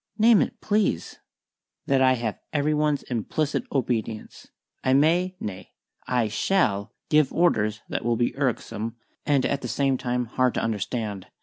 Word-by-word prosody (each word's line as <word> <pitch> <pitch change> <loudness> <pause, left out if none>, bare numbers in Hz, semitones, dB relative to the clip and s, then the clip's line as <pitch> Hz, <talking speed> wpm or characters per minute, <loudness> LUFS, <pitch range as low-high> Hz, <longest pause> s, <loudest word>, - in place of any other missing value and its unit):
"Name 225 -1 +6
it, 240 - -2
please." 205 - 0 0.7
"That 135 -1 +2
I 130 0 +5
have 115 -4 -3
every 150 0 +1
one's 150 -1 +1
implicit 135 +6 -2
obedience. 115 -4 -3 0.4
I 130 - +3
may 175 +6 +3
nay, 95 -3 -7 0.3
I 125 -3 +1
shall 105 - +1 0.2
give 150 -3 +4
orders 110 -11 +1
that - - -3
will 120 0 +1
be 120 +1 0
irksome 115 -4 -2 0.3
and 140 -3 +3
at 140 -1 0
the - - -4
same 135 +2 +1
time 125 0 -1
hard 125 +2 +1
to - - +1
understand. 105 -2 -3
130 Hz, 150 wpm, -25 LUFS, 110-150 Hz, 0.7 s, Name